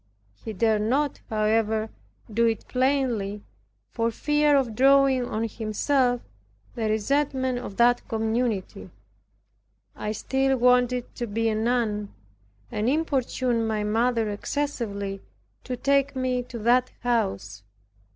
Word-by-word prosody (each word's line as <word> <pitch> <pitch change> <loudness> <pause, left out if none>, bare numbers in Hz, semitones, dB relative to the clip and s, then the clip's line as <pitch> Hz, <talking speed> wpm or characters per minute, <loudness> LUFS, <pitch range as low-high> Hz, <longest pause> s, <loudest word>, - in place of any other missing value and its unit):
He 220 - -5
dared 215 +1 +1
not, 270 +6 0
however, 220 0 +1 0.4
do 230 +2 +3
it 225 -2 -2
plainly, 250 -6 0 0.5
for 230 -1 0
fear 295 +4 +2
of 250 -5 0
drawing 270 0 +4
on 225 0 -2
himself 245 +3 0 0.5
the 225 -3 -2
resentment 260 +3 0
of 200 -5 -8
that 240 +1 +3
community. 225 -2 -2 1.1
I 210 - -3
still 265 +5 0
wanted 250 0 +2
to 240 - -4
be 225 +2 0
a - - 0
nun, 220 -2 0 0.6
and 215 +3 0
importuned 255 -6 0
my 215 -1 -1
mother 225 +1 +1
excessively 205 -5 -3 0.4
to 250 -1 -4
take 280 +1 +1
me 255 -1 0
to 235 - -6
that 245 +3 +3
house. 100 - -1
235 Hz, 120 wpm, -25 LUFS, 215-260 Hz, 1.1 s, drawing